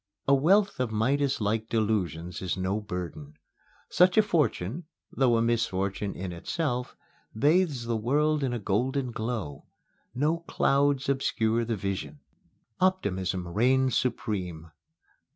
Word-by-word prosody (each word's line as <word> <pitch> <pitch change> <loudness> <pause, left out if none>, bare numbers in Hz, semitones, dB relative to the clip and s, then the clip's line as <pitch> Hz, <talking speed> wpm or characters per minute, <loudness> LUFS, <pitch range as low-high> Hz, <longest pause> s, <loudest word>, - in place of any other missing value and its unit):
A 140 - +5
wealth 190 +8 +3
of 125 -2 0
Midaslike 110 -2 0
delusions 90 -7 -1
is 95 -1 -2
no 95 +3 -1
burden. 85 -7 -6 0.6
Such 180 +2 +4
a 215 - +7
fortune, 150 - 0 0.3
though 125 -3 +3
a 115 - +2
misfortune 100 -4 -1
in 90 0 -5
itself, 125 - -3 0.4
bathes 150 -2 +2
the 115 -1 -1
world 145 +6 +1
in 130 - 0
a 120 - -1
golden 125 +6 -1
glow. 110 - -4 0.5
No 150 +6 +1
clouds 140 -4 +1
obscure 115 -4 +1
the 115 0 -1
vision. 100 - -4 0.6
Optimism 95 - 0
reigns 130 +7 +2
supreme. 90 -9 -2
115 Hz, 120 wpm, -28 LUFS, 95-140 Hz, 0.6 s, a